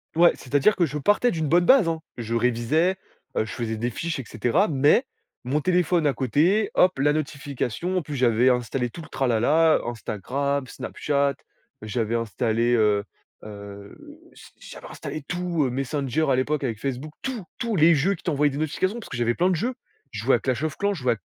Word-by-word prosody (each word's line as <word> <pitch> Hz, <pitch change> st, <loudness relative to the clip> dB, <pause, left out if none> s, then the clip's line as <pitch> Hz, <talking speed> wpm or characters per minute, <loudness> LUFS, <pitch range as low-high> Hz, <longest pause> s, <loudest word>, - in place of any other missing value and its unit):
Ouais, 170 Hz, +1 st, +6 dB
c'est-à-dire 145 Hz, +10 st, +2 dB
que 175 Hz, -, +3 dB
je 150 Hz, -1 st, -4 dB
partais 205 Hz, -, +2 dB
d'une 160 Hz, -2 st, -2 dB
bonne 175 Hz, +3 st, +4 dB
base, 255 Hz, -8 st, +5 dB
hein. 165 Hz, -1 st, -2 dB, 0.2 s
Je 115 Hz, -1 st, -3 dB
révisais, 125 Hz, +10 st, +1 dB, 0.4 s
heu, -, -, +2 dB
je -, -, -8 dB
faisais 115 Hz, -2 st, -3 dB
des 115 Hz, +3 st, -2 dB
fiches 165 Hz, +5 st, -4 dB
et -, -, -4 dB
cetera 120 Hz, -, +1 dB
mais 145 Hz, -, +3 dB, 0.4 s
mon 135 Hz, +5 st, 0 dB
téléphone 175 Hz, -1 st, +2 dB
à 140 Hz, -, +2 dB
côté, 160 Hz, -, +1 dB
hop, 185 Hz, -2 st, +3 dB
la 145 Hz, +2 st, +3 dB
notification, 145 Hz, +2 st, -3 dB
en 180 Hz, -, +1 dB
plus 150 Hz, -1 st, -6 dB
j'avais 125 Hz, -1 st, +3 dB
installé 125 Hz, 0 st, 0 dB
tout 165 Hz, -, -10 dB
le -, -, -12 dB
tralala, 135 Hz, +6 st, +3 dB
Instagram, 130 Hz, +5 st, -2 dB
Snapchat, 140 Hz, +1 st, -1 dB, 0.5 s
j'avais 110 Hz, +1 st, -2 dB
installé, 115 Hz, +1 st, 0 dB
heu 105 Hz, -2 st, +2 dB, 0.4 s
heu, 100 Hz, -1 st, -10 dB, 0.4 s
j'a -, -, -16 dB, 0.3 s
j'avais -, -, -11 dB
installé 155 Hz, -, -7 dB
tout, 175 Hz, -4 st, -1 dB
heu, 130 Hz, -, 0 dB
Messenger 135 Hz, +3 st, -1 dB
à -, -, +4 dB
l'époque 145 Hz, +3 st, 0 dB
avec 115 Hz, -5 st, -3 dB
Facebook, 135 Hz, +4 st, -4 dB
tout, 255 Hz, -6 st, -4 dB, 0.2 s
tout, 230 Hz, -2 st, -1 dB
les 165 Hz, 0 st, +6 dB
jeux 170 Hz, +7 st, +1 dB
qui -, -, -18 dB
t'envoyaient 150 Hz, -4 st, +2 dB
des 135 Hz, -, -5 dB
notifications, 185 Hz, +8 st, -1 dB
parce 225 Hz, -, -11 dB
que 125 Hz, -, -5 dB
j'avais 120 Hz, 0 st, +1 dB
plein 180 Hz, +2 st, +2 dB
de -, -, +1 dB
jeux, 240 Hz, +10 st, -2 dB, 0.4 s
je 105 Hz, -, -5 dB
jouais 130 Hz, +1 st, +4 dB
à -, -, -9 dB
Clash 130 Hz, +3 st, -2 dB
of 155 Hz, -2 st, -3 dB
Clans, 200 Hz, 0 st, 0 dB
je 145 Hz, -, -9 dB
jouais 125 Hz, -, +3 dB
à -, -, -6 dB
140 Hz, 205 wpm, -24 LUFS, 120-165 Hz, 0.5 s, Ouais